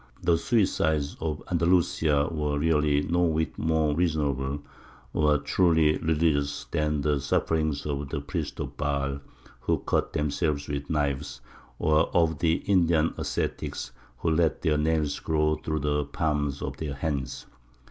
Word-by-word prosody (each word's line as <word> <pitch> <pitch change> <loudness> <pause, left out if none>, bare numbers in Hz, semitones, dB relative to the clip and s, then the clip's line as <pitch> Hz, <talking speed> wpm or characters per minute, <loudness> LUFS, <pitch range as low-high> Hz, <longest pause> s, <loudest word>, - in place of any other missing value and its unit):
The 85 - +4
suicides 80 - +1
of 80 -2 -3
Andalusia 85 -4 +2
were 75 -2 -1
really 75 -2 +2
no 85 +2 +1
whit 80 -2 +1
more 80 -2 +1
reasonable 70 -4 0 0.5
or 75 -1 +3
truly 80 +1 +3
religious 75 -3 +1
than 75 -1 0
the 75 0 +1
sufferings 80 +2 0
of 70 -1 -3
the 75 - -2
priests 70 +1 -4
of - - -5
Baal 70 -1 -1 0.4
who - - 0
cut - - 0
themselves 75 0 -1
with 70 -1 -4
knives, 70 -4 -1 0.4
or 80 0 +3
of 80 -4 +3
the 80 0 +1
Indian 85 -5 +3
ascetics - - -3 0.3
who 80 - 0
let 80 -3 +1
their 75 -2 +2
nails 75 -1 0
grow 75 -1 +1
through 80 0 -3
the 75 0 0
palms 75 -1 -1
of - - -4
their 75 -3 -4
hands. 70 -3 -3
75 Hz, 140 wpm, -27 LUFS, 70-80 Hz, 0.5 s, The